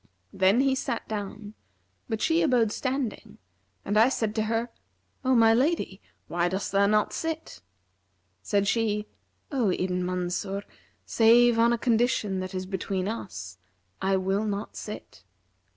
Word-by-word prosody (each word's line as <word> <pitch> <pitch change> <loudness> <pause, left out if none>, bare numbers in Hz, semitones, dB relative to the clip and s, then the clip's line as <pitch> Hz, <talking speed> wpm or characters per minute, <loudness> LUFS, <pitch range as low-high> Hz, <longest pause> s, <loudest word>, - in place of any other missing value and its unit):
[FN#346] - - -13
Then 190 +5 +5
he 270 -1 +3
sat 240 -3 -3
down, 210 0 -6 0.6
but 220 -2 -2
she 325 +1 +3
abode 250 -8 +3
standing 255 -3 -3 0.5
and 205 +2 +2
I 230 +3 +6
said 220 -5 -1
to 220 -1 0
her, 230 +2 -1 0.5
'O 260 0 +3
my 225 -1 +6
lady, 255 - 0 0.3
why 175 0 0
dost 190 +3 -3
thou 200 0 +4
not 210 0 +2
sit?' 325 0 -4 0.8
Said 200 - 0
she, 210 -1 +1 0.5
'O 250 -7 +1
Ibn 180 0 -1
Mansur, 185 +2 -2 0.4
save 235 +1 +5
on 235 +1 +5
a 235 - +2
condition 225 -4 +1
that 185 0 -5
is 185 0 -3
between 190 0 -3
us, 175 - -6 0.4
I 195 0 +2
will 195 +3 0
not 205 0 -4
sit.' 210 - -8
215 Hz, 150 wpm, -27 LUFS, 190-235 Hz, 0.8 s, I